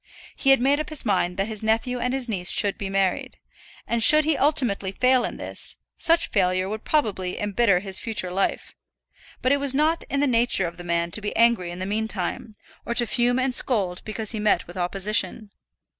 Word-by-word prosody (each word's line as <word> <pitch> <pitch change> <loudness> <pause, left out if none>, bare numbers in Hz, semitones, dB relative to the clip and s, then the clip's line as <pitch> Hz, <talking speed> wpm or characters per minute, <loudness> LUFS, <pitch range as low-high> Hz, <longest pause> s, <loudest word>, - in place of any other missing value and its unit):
He 275 - 0
had 270 - +6
made 275 +4 +2
up 305 - -4
his 310 -4 -2
mind 185 -3 0
that 195 +1 -1
his 220 -2 -5
nephew 225 +3 -1
and 250 +1 -1
his 265 -1 +1
niece 190 -5 0
should 200 -1 +2
be 195 - -6
married, 195 -1 -1 0.5
and 235 0 -1
should 305 +6 +7
he 315 -1 +1
ultimately 250 -11 +2
fail 255 +4 +2
in - - -5
this, - - -2 0.2
such 335 0 +1
failure 185 -2 +1
would 215 +2 -6
probably 200 -11 -1
embitter 205 -2 +1
his 190 -1 -2
future 210 -5 -2
life; 195 +2 -2 0.7
but 255 - +2
it 280 - +2
was 280 -1 0
not 315 +3 +1
in 280 - -1
the 290 - +2
nature 240 -6 +2
of 170 - -7
the 175 - -9
man 170 0 -2
to 215 - +1
be 210 - -5
angry 230 -6 +2
in 175 - -7
the 185 - -4
meantime, 210 0 -4 0.3
or 235 - -4
to 240 - +5
fume 240 +2 +1
and 260 0 0
scold 200 -9 0
because 215 0 -3
he 220 - -4
met 210 0 +1
with 175 - -13
opposition. 195 +3 -2
220 Hz, 210 wpm, -23 LUFS, 190-255 Hz, 0.7 s, should